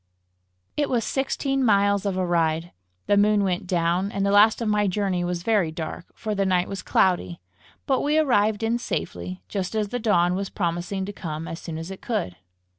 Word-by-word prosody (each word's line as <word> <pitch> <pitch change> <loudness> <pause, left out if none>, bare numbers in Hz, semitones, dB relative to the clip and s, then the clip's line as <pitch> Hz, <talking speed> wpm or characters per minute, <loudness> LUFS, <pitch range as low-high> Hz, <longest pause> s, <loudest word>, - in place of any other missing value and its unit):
It 290 -1 0
was 240 -3 +1
sixteen 270 +1 -1
miles 200 -2 +3
of 190 -2 -1
a 185 - +1
ride. 165 -1 0 0.3
The 205 - +3
moon 205 0 +4
went 185 -1 -1
down, 175 +2 +1
and 200 -1 -1
the 200 - +2
last 210 +2 +6
of 230 - -2
my 210 -1 +2
journey 190 -2 0
was 175 -1 -2
very 205 -6 +2
dark, 160 +1 -6
for 215 -1 -3
the 200 -1 +1
night 180 -2 +2
was 195 -1 -5
cloudy; 135 - +1 0.5
but 265 -2 +1
we 295 +2 +1
arrived 220 -8 +2
in 230 +2 +1
safety, 90 - -4
just 190 +2 -3
as 210 -2 0
the 245 - -3
dawn 180 -6 +3
was 195 +1 -2
promising 180 +1 -2
to 205 - -6
come 160 -3 -5
as 165 - -6
soon 165 -2 -6
as 165 +3 -6
it 190 - -9
could. 210 - -2
195 Hz, 200 wpm, -24 LUFS, 175-215 Hz, 0.5 s, last